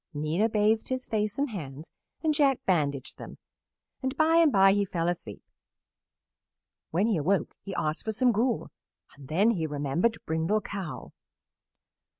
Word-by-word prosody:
Nina 160 +9 0
bathed 215 +1 +2
his 255 -1 -3
face 210 -2 -1
and 280 -2 -1
hands 150 -5 -8 0.3
and 310 -1 +2
Jack 275 -3 +2
bandaged 145 -7 -1
them, - - -9 0.6
and 260 +1 -3
by 320 +1 +4
and 330 -3 +5
by 195 -2 +6
he 205 0 +2
fell 170 -3 -2
asleep. 170 - -4 1.5
When 180 +6 +1
he 220 -5 +1
awoke 185 +6 0
he 195 -1 -7
asked 155 +1 -2
for 220 - 0
some 245 +3 +3
gruel, 230 +2 0 0.4
and 140 -2 -13
then 195 - +3
he 165 -8 -1
remembered 150 +9 0
Brindle 160 +7 0
Cow. 195 -6 -6
200 Hz, 150 wpm, -28 LUFS, 160-230 Hz, 1.5 s, by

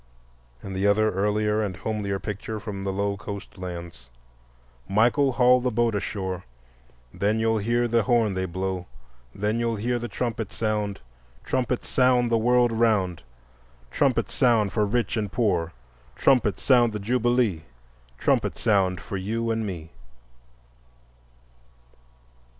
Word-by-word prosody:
And 95 - -6
the 95 +2 +1
other 110 +1 +3
earlier 105 +2 +1
and 100 -4 -3
homelier 105 -3 -2
picture 105 +2 -5
from 105 -2 -6
the 95 0 -2
low 100 +1 -1
coast 100 -1 -8
lands: 85 -7 -8 0.8
"Michael, 125 +7 +3
haul 125 0 +5
the 125 - +1
boat 120 -1 +1
ashore, 95 -3 -3 0.7
Then 105 +2 0
you'll 110 0 +1
hear 120 +3 +1
the 115 0 +2
horn 115 -3 +2
they 95 0 -1
blow, 95 0 -3 0.5
Then 105 +3 -1
you'll 115 -1 0
hear 120 +3 -1
the 120 - -4
trumpet 115 -4 -3
sound, 105 -3 -2 0.4
Trumpet 125 -1 -1
sound 125 -2 +2
the 115 - +4
world 120 +1 +3
around, 110 -7 +1 0.7
Trumpet - - +1
sound 115 -5 +2
for 105 -2 +1
rich 115 +1 0
and 105 -3 -2
poor, 90 -8 0 0.4
Trumpet 115 - +2
sound 120 -4 +4
the 105 - -3
Jubilee, 120 -4 +1 0.6
Trumpet - - +1
sound 95 -5 +2
for 100 - -5
you 115 +4 -2
and 110 -1 -1
me." 85 -4 -7
110 Hz, 135 wpm, -25 LUFS, 100-120 Hz, 0.8 s, haul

